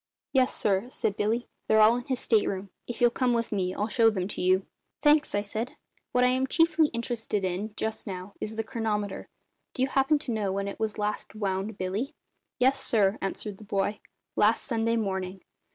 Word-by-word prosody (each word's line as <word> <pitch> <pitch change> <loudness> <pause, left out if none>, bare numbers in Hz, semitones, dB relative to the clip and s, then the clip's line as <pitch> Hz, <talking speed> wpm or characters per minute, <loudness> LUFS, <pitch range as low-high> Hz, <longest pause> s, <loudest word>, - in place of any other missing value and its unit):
"Yes, 260 -2 +3
sir," 200 +3 +1
said 210 -5 -1
Billy. 225 +4 0 0.2
"They're 220 - +5
all 215 +2 +7
in 245 0 -4
his 260 -2 -1
state 220 -3 +3
room. 195 0 -4 0.2
If 240 - -5
you'll 240 -1 +5
come 250 0 +1
with 230 0 -1
me 185 -3 -1
I'll 210 - 0
show 225 0 +4
them 190 -4 -2
to - - -4
you." 185 +1 +3 0.3
"Thanks," 300 -4 +4
I 205 - +1
said. 220 +4 -4 0.4
"What 250 - +3
I 250 - +5
am 260 +1 +1
chiefly 325 +1 +4
interested 235 -4 -2
in, 200 +4 -3
just 220 0 -3
now, 185 0 -6
is 220 - -3
the 225 - -1
chronometer. 215 -4 -3 0.5
Do 255 - +1
you 265 - +1
happen 270 +3 +3
to 285 -4 -4
know 210 -4 0
when 200 +1 -2
it 200 - -6
was 220 -1 -2
last 210 0 -3
wound, 200 0 -2
Billy?" 210 - -2 0.4
"Yes, 265 +2 +3
sir," 205 -2 +2
answered 195 +1 -4
the 215 - -12
boy; 205 +1 -1 0.4
"last 215 +2 +3
Sunday 230 0 0
morning. 190 -3 -2
220 Hz, 200 wpm, -28 LUFS, 200-245 Hz, 0.5 s, all